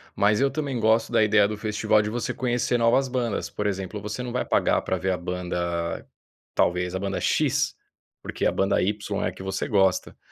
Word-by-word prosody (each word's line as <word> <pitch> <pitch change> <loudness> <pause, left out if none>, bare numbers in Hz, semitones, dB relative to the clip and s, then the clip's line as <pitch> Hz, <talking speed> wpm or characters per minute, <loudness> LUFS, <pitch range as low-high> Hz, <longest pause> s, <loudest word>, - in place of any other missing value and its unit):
mas 105 +2 +3
eu 140 - +4
também 140 -4 -3
gosto 110 +1 +2
da 110 - +4
ideia 105 -1 +4
do 105 - -4
festival 105 0 +1
de 105 - -3
você 120 +1 -2
conhecer 120 -1 0
novas 120 +4 +3
bandas, 125 -4 -2
por 105 - -3
exemplo, 95 +1 -3
você 110 +4 -4
não 120 - -5
vai 125 - 0
pagar - - +2
pra - - -1
ver 95 0 -1
a 90 - 0
banda, 85 -1 -3 0.5
talvez 90 +1 +1
a - - -1
banda 100 -1 -3
X, - - +1 0.5
porque - - -5
a - - +2
banda 95 - +1
Y 105 +2 -2
é - - +1
a - - -2
que 95 - -10
você 95 0 -2
gosta. 95 -3 +1
105 Hz, 210 wpm, -25 LUFS, 95-115 Hz, 0.5 s, eu